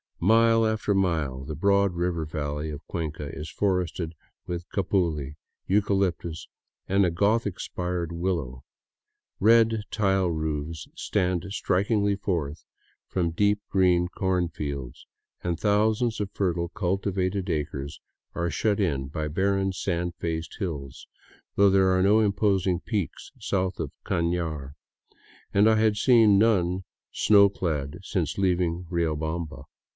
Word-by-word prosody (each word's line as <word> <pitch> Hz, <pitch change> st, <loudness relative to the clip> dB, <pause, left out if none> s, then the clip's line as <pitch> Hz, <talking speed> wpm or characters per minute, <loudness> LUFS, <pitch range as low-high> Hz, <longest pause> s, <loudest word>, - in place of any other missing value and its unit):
Mile 115 Hz, +2 st, +5 dB
after 110 Hz, -1 st, 0 dB
mile 80 Hz, -9 st, 0 dB
the 75 Hz, +2 st, -5 dB
broad 100 Hz, +3 st, +2 dB
river 85 Hz, -2 st, -1 dB
valley 75 Hz, 0 st, -3 dB
of 75 Hz, 0 st, -8 dB
Cuenca 80 Hz, -3 st, -4 dB
is 75 Hz, +1 st, -6 dB
forested 90 Hz, -4 st, -1 dB, 0.3 s
with 85 Hz, 0 st, -5 dB
capuli, 85 Hz, -7 st, 0 dB, 0.3 s
eucalyptus, 95 Hz, -5 st, 0 dB, 0.4 s
and 100 Hz, +1 st, +3 dB
a 90 Hz, -, +1 dB
Gothic 100 Hz, +2 st, +1 dB
spired 90 Hz, -2 st, -3 dB
willow. 85 Hz, -8 st, -3 dB, 0.8 s
Red, 115 Hz, 0 st, +4 dB
tile 95 Hz, -4 st, +1 dB
roofs 80 Hz, -1 st, -3 dB
stand 90 Hz, -4 st, -1 dB
strikingly 100 Hz, +1 st, +1 dB
forth 85 Hz, -7 st, -3 dB, 0.4 s
from 85 Hz, -3 st, -1 dB
deep 105 Hz, +4 st, +2 dB
green 90 Hz, -2 st, +3 dB
corn 90 Hz, -1 st, 0 dB
fields, 70 Hz, -6 st, -6 dB, 0.4 s
and 85 Hz, -2 st, -2 dB
thousands 110 Hz, +2 st, +2 dB
of 100 Hz, -2 st, -3 dB
fertile, 85 Hz, -4 st, -1 dB
cultivated 95 Hz, 0 st, -1 dB
acres 75 Hz, -2 st, -3 dB, 0.4 s
are 85 Hz, 0 st, -1 dB
shut 100 Hz, +6 st, 0 dB
in 70 Hz, -9 st, 0 dB
by 75 Hz, +2 st, -3 dB
barren, 95 Hz, +4 st, +1 dB
sand 90 Hz, -2 st, -2 dB
faced 80 Hz, 0 st, -4 dB
hills, 75 Hz, -9 st, -5 dB, 0.5 s
though 100 Hz, 0 st, +5 dB
there 95 Hz, -1 st, +4 dB
are 95 Hz, -, +2 dB
no 105 Hz, +3 st, +5 dB
imposing 100 Hz, -4 st, +2 dB
peaks 100 Hz, -3 st, -4 dB
south 95 Hz, -1 st, -1 dB
of 80 Hz, -4 st, -3 dB
Caiiar, 85 Hz, -5 st, -1 dB, 0.8 s
and 100 Hz, +2 st, +5 dB
I 110 Hz, -, +4 dB
had 110 Hz, -1 st, +3 dB
seen 110 Hz, -3 st, +5 dB
none 95 Hz, -4 st, +2 dB, 0.3 s
snow 100 Hz, -2 st, +5 dB
clad 75 Hz, -8 st, -3 dB
since -, -, -2 dB
leaving 90 Hz, -2 st, 0 dB
Riobamba. 80 Hz, -2 st, -2 dB
90 Hz, 125 wpm, -26 LUFS, 80-100 Hz, 0.8 s, Mile